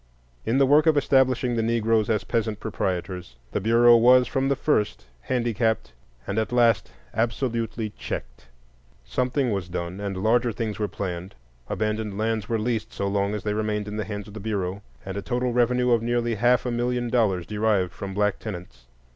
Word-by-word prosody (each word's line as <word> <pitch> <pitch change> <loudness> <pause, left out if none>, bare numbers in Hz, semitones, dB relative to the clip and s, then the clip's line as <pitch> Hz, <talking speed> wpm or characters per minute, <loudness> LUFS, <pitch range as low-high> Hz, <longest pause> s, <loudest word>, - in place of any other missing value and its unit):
In 120 - +2
the 135 - +5
work 150 +4 +5
of 155 -2 +5
establishing 130 -3 +3
the 115 - +1
Negroes 115 -1 +1
as 110 -2 +1
peasant 110 -2 -1
proprietors, 90 - -3 0.2
the - - -1
Bureau 120 +3 +6
was 125 +2 +6
from 135 0 0
the 140 - +2
first 105 - 0 0.2
handicapped 115 - 0 0.3
and 100 - -1
at 110 - -2
last 120 -4 +3 0.2
absolutely 115 -2 -1
checked. 100 - -7 0.6
Something 125 0 0
was 95 -4 -3
done, 90 +1 -4
and 100 -2 -3
larger 115 +4 +2
things 110 -1 -4
were 105 - 0
planned; 95 -1 -5 0.3
abandoned 110 -2 -2
lands 110 -1 -1
were 115 - +1
leased 110 0 -2
so 100 - -3
long 100 +1 0
as 105 - -5
they 105 - -1
remained 105 -1 -1
in 105 +1 -5
the 105 - -1
hands 105 -1 -6
of 105 - -12
the 110 - -7
Bureau, 100 -2 -3 0.2
and 95 +1 -5
a - - -2
total 125 +2 -1
revenue 125 +1 +2
of 115 -2 +4
nearly 120 0 0
half 120 +2 +3
a 125 - -1
million 120 +1 -1
dollars 100 -8 +2
derived 105 -4 +1
from 95 -1 -7
black 105 -1 +1
tenants. 85 - -8
110 Hz, 185 wpm, -25 LUFS, 100-120 Hz, 0.6 s, Bureau